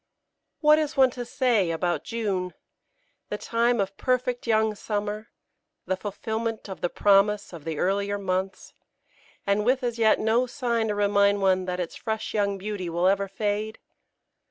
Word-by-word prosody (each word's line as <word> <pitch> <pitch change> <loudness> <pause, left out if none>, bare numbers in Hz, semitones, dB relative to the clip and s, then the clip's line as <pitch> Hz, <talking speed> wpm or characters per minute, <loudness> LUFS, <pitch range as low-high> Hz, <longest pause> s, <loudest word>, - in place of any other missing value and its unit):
What 305 0 +6
is 305 -1 -2
one 260 -1 +6
to 245 0 -5
say 240 -7 +1
about 165 -1 -1
June 195 -5 -2 0.7
the - - -2
time 235 0 +1
of 195 0 -1
perfect 250 -1 -1
young 220 -1 +3
summer, 210 +1 -4 0.6
the 190 - 0
fulfilment 220 +3 -4
of 190 - -8
the 175 - 0
promise 205 0 +3
of 165 -3 -10
the 160 -2 -3
earlier 200 +4 0
months, 190 -1 -3 0.7
and 200 +1 +2
with 255 +3 +2
as 235 -1 -2
yet 220 -1 +4
no 230 +3 +2
sign 235 -3 -1
to 210 - -1
remind 200 0 +3
one 185 -1 +3
that 180 0 -3
its 175 -2 -4
fresh 220 -1 -4
young 200 -2 0
beauty 195 -2 -4
will 170 +2 0
ever 200 +1 +2
fade? 210 +2 -2
205 Hz, 160 wpm, -26 LUFS, 195-230 Hz, 0.7 s, What